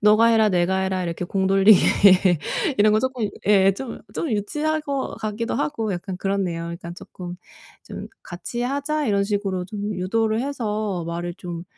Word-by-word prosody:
너가 215 +2 +5
해라 225 -2 +4
내가 185 0 +1
해라 190 -1 -1
이렇게 170 0 -3
공 190 +1 -1
돌리기 195 +1 +6 1.0
이런 210 +1 +5
거 215 - +3
조금 255 -4 -1 0.2
예 195 -1 +5
좀 250 +1 -7
좀 315 - -2
유치한 300 +10 -1
것 280 -3 -3
같기도 220 +2 -3
하고 225 -8 -1
약간 185 +1 -5
그렇네요. 190 -3 -1
그러니깐 170 0 -7
조금 180 0 -9 0.5
'좀 - - -8
같이 235 +7 -5
하자.' 285 +3 -1
이런 200 -2 +2
식으로 195 -3 -2
좀 205 +1 -4
유도를 220 +4 0
해서 215 -9 -2
말을 170 +1 -4
좀 175 -2 -7
205 Hz, 320 characters per minute, -23 LUFS, 185-230 Hz, 1.0 s, 돌리기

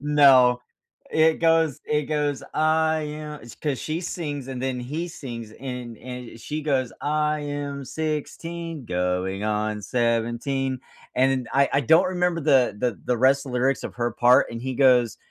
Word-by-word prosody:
No. 135 -4 +5 0.5
It 160 0 +4
goes 165 -3 +3
it 150 0 +1
goes, 150 -2 -1
I 160 0 +2
am 150 0 -6
It's 120 - -11
'cause 145 -4 -2
she 160 +2 -3
sings 145 -7 -4
and 130 -2 -5
then 130 -1 -1
he 150 +8 -4
sings 120 -9 -8
and 125 -3 -7
and 125 -2 -8
she 150 +5 -4
goes, 130 -5 0
I 150 0 0
am 145 -1 -4
16 160 +1 -4
going 90 +2 -1
on 105 0 -1
17. 120 +3 -1 0.3
And 130 -1 +1
I 140 - +5
I - - -2
I 140 - +4
don't 160 +5 +5
remember 180 -2 0
the 130 -8 +3
the 115 -7 -1
the 125 - +1
rest 135 +3 +3
of 130 - -6
the 125 - 0
lyrics 130 +1 +1
of - - -6
her 120 0 0
part. 125 +3 +4
And 115 0 -6
he 130 0 -3
goes 125 -4 +4
135 Hz, 175 wpm, -24 LUFS, 125-150 Hz, 0.5 s, No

